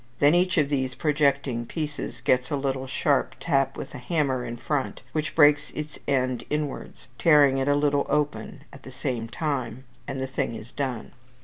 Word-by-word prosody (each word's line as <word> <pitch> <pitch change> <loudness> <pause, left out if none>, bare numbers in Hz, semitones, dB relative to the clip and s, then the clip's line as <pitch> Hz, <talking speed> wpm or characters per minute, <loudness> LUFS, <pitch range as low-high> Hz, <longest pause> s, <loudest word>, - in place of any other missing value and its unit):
5); 120 - -33
then 145 +2 +6
each 180 +1 +2
of 145 -3 +3
these 130 -3 -1
projecting 140 -5 +1
pieces 150 +3 -5
gets 125 0 +2
a - - 0
little 135 -1 -2
sharp 135 +1 +1
tap 135 -4 +1
with - - -6
the - - -8
hammer 135 -2 0
in 120 0 -5
front, 145 0 -2
which 155 +1 -2
beaks 145 -2 +5
its 150 0 -6
edge 130 -3 0
inwards, 150 -3 -4
tearing 145 -4 +5
it 135 - -1
a 145 - +4
little 145 -1 +2
open 150 -1 -1
at 140 - -12
the 130 - -11
same 125 -3 -3
time, 130 -3 -3 0.2
and 135 - -4
the 130 - -1
thing 130 -3 -2
is 115 +2 -9
done. 130 -5 -4
140 Hz, 190 wpm, -26 LUFS, 130-150 Hz, 0.2 s, then